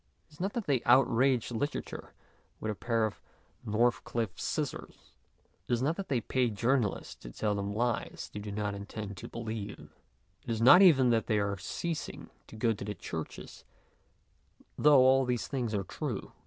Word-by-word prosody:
It 155 Hz, -, -24 dB
is 150 Hz, -, -18 dB
not 195 Hz, +3 st, -2 dB
that 235 Hz, -4 st, -3 dB
they 135 Hz, -5 st, +1 dB
outrage 125 Hz, 0 st, +3 dB
literature 145 Hz, +6 st, -4 dB, 0.4 s
with 110 Hz, -, -2 dB
a -, -, -2 dB
pair 115 Hz, +1 st, 0 dB
of 110 Hz, -, -5 dB, 0.4 s
North 120 Hz, +3 st, +1 dB
cliffe 115 Hz, -5 st, -3 dB
scissors; -, -, -4 dB, 0.5 s
it -, -, 0 dB
is 120 Hz, -, +1 dB
not 155 Hz, +4 st, +1 dB
that 195 Hz, -, -4 dB
they 130 Hz, -3 st, +1 dB
pay 125 Hz, 0 st, +1 dB
jour 115 Hz, +5 st, +1 dB
nalists 110 Hz, -7 st, -2 dB
to -, -, -10 dB
tell 105 Hz, -, -1 dB
them 100 Hz, 0 st, -2 dB
lies 120 Hz, +2 st, -2 dB
they 105 Hz, -, -5 dB
do 105 Hz, 0 st, -6 dB
not 105 Hz, 0 st, -2 dB
intend 100 Hz, 0 st, -6 dB
to -, -, -7 dB
believe; 110 Hz, -3 st, -6 dB, 0.5 s
it -, -, -10 dB
is 115 Hz, -1 st, -1 dB
not 130 Hz, +11 st, +8 dB
even 135 Hz, -10 st, +6 dB
that 115 Hz, -1 st, +1 dB
they 110 Hz, -, +2 dB
are 100 Hz, -1 st, 0 dB
ceasing 155 Hz, -, -5 dB, 0.2 s
to -, -, -12 dB
go 115 Hz, +1 st, +1 dB
to 100 Hz, -, -7 dB
the 105 Hz, +1 st, -4 dB
churches, 80 Hz, -4 st, -7 dB, 1.1 s
though 145 Hz, -3 st, +6 dB
all 130 Hz, +1 st, +5 dB
these 125 Hz, -2 st, -1 dB
things 125 Hz, -5 st, -2 dB
are 100 Hz, -, -1 dB
true. -, -, -5 dB
115 Hz, 185 wpm, -31 LUFS, 105-130 Hz, 1.1 s, not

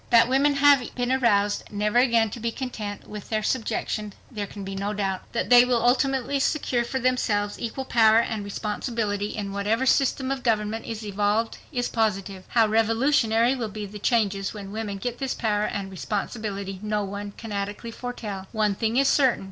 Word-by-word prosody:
That 235 Hz, -1 st, +6 dB
women 280 Hz, +3 st, +3 dB
have 280 Hz, -3 st, +4 dB
been 245 Hz, 0 st, -1 dB
aroused 205 Hz, -6 st, +2 dB
never 210 Hz, +3 st, +1 dB
again 230 Hz, -4 st, +3 dB
to 235 Hz, -, -6 dB
be 230 Hz, 0 st, -1 dB
content 220 Hz, -6 st, -6 dB
with 210 Hz, -1 st, -8 dB
their 215 Hz, -1 st, 0 dB
subjection 215 Hz, -3 st, -2 dB, 0.2 s
there 210 Hz, -4 st, -4 dB
can 200 Hz, 0 st, -8 dB
be 195 Hz, 0 st, -5 dB
no 200 Hz, +2 st, -2 dB
doubt. 195 Hz, -2 st, -3 dB
That -, -, -2 dB
they 245 Hz, 0 st, +9 dB
will 250 Hz, -1 st, +2 dB
ultimately 270 Hz, +1 st, +2 dB
secure 265 Hz, -4 st, +1 dB
for 260 Hz, +3 st, -3 dB
themselves 215 Hz, -5 st, 0 dB
equal 245 Hz, +3 st, -4 dB
power 225 Hz, -3 st, +5 dB
and 220 Hz, -2 st, 0 dB
responsibility 210 Hz, 0 st, -3 dB
in 200 Hz, -2 st, -4 dB
whatever 210 Hz, +5 st, 0 dB
system 265 Hz, 0 st, +2 dB
of 270 Hz, -1 st, -2 dB
government 220 Hz, -1 st, 0 dB
is 225 Hz, -1 st, -5 dB
evolved 205 Hz, +2 st, 0 dB
is 245 Hz, -4 st, -1 dB
positive. 195 Hz, -4 st, -1 dB
How 230 Hz, -2 st, +4 dB
revolutionary 225 Hz, +2 st, +3 dB
will 235 Hz, -4 st, -3 dB
be 210 Hz, 0 st, -6 dB
the 205 Hz, +1 st, -9 dB
changes 205 Hz, -3 st, 0 dB
when 200 Hz, -2 st, -7 dB
women 210 Hz, -2 st, -4 dB
get 240 Hz, +4 st, -4 dB
this 270 Hz, -1 st, -2 dB
power 210 Hz, -2 st, 0 dB
and 195 Hz, -2 st, -4 dB
responsibility 200 Hz, 0 st, -4 dB
no 210 Hz, -1 st, -1 dB
one 200 Hz, +1 st, -6 dB
can 225 Hz, -2 st, -8 dB
adequately 205 Hz, +3 st, -4 dB
foretell. 215 Hz, -6 st, -6 dB
One 215 Hz, -3 st, +1 dB
thing 225 Hz, +3 st, -1 dB
is 275 Hz, 0 st, +4 dB
certain. 265 Hz, -4 st, +3 dB
220 Hz, 185 wpm, -25 LUFS, 205-245 Hz, 0.2 s, they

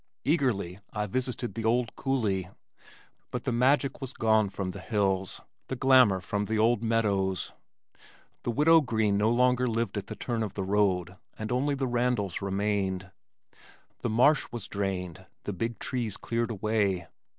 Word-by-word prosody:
Eagerly 115 Hz, -, 0 dB
I 105 Hz, -1 st, -2 dB
visited 125 Hz, +3 st, -2 dB
the 115 Hz, -, -4 dB
old 115 Hz, +1 st, +1 dB
coulee, 105 Hz, -9 st, -1 dB, 0.8 s
but 125 Hz, -1 st, -4 dB
the 130 Hz, -, -1 dB
magic 135 Hz, +3 st, +2 dB
was 130 Hz, -1 st, -5 dB
gone 110 Hz, -2 st, +3 dB
from 95 Hz, -1 st, -4 dB
the -, -, -8 dB
hills, 95 Hz, -3 st, -1 dB, 0.3 s
the 130 Hz, -, -3 dB
glamour 130 Hz, -7 st, +5 dB
from 105 Hz, +3 st, -2 dB
the 110 Hz, +2 st, +3 dB
meadows. 100 Hz, -5 st, 0 dB, 0.9 s
The -, -, -4 dB
Widow 160 Hz, +7 st, +5 dB
Green 110 Hz, -6 st, +1 dB
no 105 Hz, +2 st, +3 dB
longer 125 Hz, +1 st, +3 dB
lived 115 Hz, -3 st, -1 dB
at 100 Hz, -, -9 dB
the -, -, -6 dB
turn 120 Hz, -2 st, -3 dB
of 105 Hz, -4 st, -3 dB
the 95 Hz, -, -2 dB
road, 95 Hz, -2 st, +1 dB, 0.2 s
and 110 Hz, +1 st, -4 dB
only 140 Hz, +3 st, +1 dB
the 135 Hz, -1 st, -1 dB
Randals 120 Hz, -7 st, 0 dB
remained. 95 Hz, -2 st, -1 dB, 0.9 s
The -, -, -2 dB
marsh 130 Hz, +7 st, +4 dB
was 120 Hz, -4 st, -6 dB
drained, 95 Hz, -4 st, -4 dB, 0.2 s
the 105 Hz, -, -3 dB
big 115 Hz, +5 st, -3 dB
trees 115 Hz, -5 st, -3 dB
cleared 115 Hz, 0 st, -2 dB
away. 105 Hz, -4 st, 0 dB
110 Hz, 155 wpm, -28 LUFS, 100-125 Hz, 0.9 s, glamour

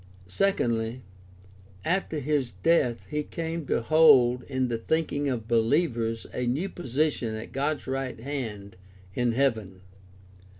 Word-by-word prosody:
Secondly, 115 Hz, -, 0 dB, 0.8 s
after 175 Hz, -2 st, 0 dB
his 140 Hz, -4 st, -1 dB
death 125 Hz, -8 st, +2 dB
he 150 Hz, 0 st, 0 dB
came 165 Hz, 0 st, -5 dB
to 115 Hz, -, 0 dB
hold 135 Hz, -5 st, +6 dB
in 130 Hz, -2 st, -1 dB
the 115 Hz, -2 st, -2 dB
thinking 145 Hz, +1 st, 0 dB
of 115 Hz, -4 st, -3 dB
believers 115 Hz, -1 st, +1 dB
a 125 Hz, -, -2 dB
new 150 Hz, +11 st, -1 dB
position 135 Hz, -7 st, -1 dB
at 110 Hz, +1 st, -7 dB
God's 145 Hz, +3 st, -1 dB
right 135 Hz, -2 st, -3 dB
hand 110 Hz, -7 st, -5 dB, 0.4 s
in 120 Hz, +2 st, +1 dB
heaven. 110 Hz, -8 st, 0 dB
130 Hz, 125 wpm, -27 LUFS, 115-150 Hz, 0.8 s, hold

